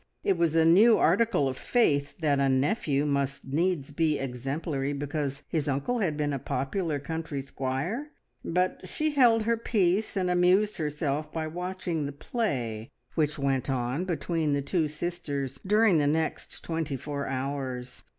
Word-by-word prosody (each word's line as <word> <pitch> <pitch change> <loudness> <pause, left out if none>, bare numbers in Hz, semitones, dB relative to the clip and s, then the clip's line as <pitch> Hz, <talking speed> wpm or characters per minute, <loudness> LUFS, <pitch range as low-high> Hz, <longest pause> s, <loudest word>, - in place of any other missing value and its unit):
It 195 - +2
was 170 -2 +1
a 165 -1 +5
new 210 +8 +7
article 230 -12 +3
of 130 - -2
faith 145 - +1
that 145 -3 +2
a 135 -1 +3
nephew 140 +1 +1
must 140 -1 -1
needs 150 +1 0
be 155 0 +1
exemplary 135 +2 -3
because 145 0 -3
his 155 -3 -1
uncle 140 - 0
had 165 -8 0
been 145 -1 0
a 140 - -2
popular 155 +5 -2
country 160 0 -4
squire, 140 - -3 0.3
but 180 +2 0
she 310 +8 0
held 240 -6 +5
her 230 +1 +1
peace 210 -2 +1
and 185 -1 +1
amused 180 +4 +3
herself 150 -1 -2
by 160 -1 -2
watching 175 -2 -3
the - - -4
play 130 - -3 0.2
which 150 -2 0
went 135 -2 0
on 130 +6 -1
between 165 -3 -1
the 140 -1 0
two 160 +1 +1
sisters 150 -4 -4
during 210 -4 +4
the 145 - +2
next 160 +2 -2
twenty 160 -3 -2
four 140 +1 -4
hours. 130 -2 -4
150 Hz, 160 wpm, -28 LUFS, 140-180 Hz, 0.3 s, new